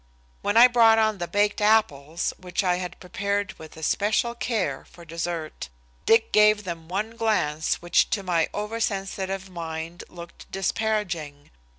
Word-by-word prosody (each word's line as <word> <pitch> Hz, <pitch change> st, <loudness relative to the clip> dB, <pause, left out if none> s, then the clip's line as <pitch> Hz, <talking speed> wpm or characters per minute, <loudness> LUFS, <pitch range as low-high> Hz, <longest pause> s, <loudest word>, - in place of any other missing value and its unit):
When 205 Hz, -, 0 dB
I 240 Hz, +2 st, +10 dB
brought 230 Hz, -2 st, +5 dB
on 215 Hz, -2 st, +2 dB
the 175 Hz, -, -3 dB
baked 205 Hz, +2 st, +1 dB
apples 175 Hz, -8 st, +1 dB
which 180 Hz, +2 st, -2 dB
I 180 Hz, -1 st, +2 dB
had 180 Hz, -1 st, -6 dB
prepared 200 Hz, +2 st, -2 dB
with 160 Hz, 0 st, -12 dB
especial 210 Hz, +8 st, 0 dB
care 215 Hz, -, -2 dB
for 170 Hz, 0 st, -15 dB
dessert, 165 Hz, -, -5 dB, 0.4 s
Dick 225 Hz, 0 st, +4 dB
gave 210 Hz, 0 st, +5 dB
them 165 Hz, -3 st, -6 dB
one 205 Hz, +5 st, -2 dB
glance 175 Hz, -10 st, 0 dB
which 175 Hz, -, +3 dB
to 200 Hz, -, -1 dB
my 170 Hz, -3 st, +1 dB
oversensitive 195 Hz, -3 st, -3 dB
mind 165 Hz, -1 st, -6 dB
looked 170 Hz, -1 st, -12 dB
disparaging. 185 Hz, -8 st, -2 dB
190 Hz, 145 wpm, -25 LUFS, 170-215 Hz, 0.4 s, I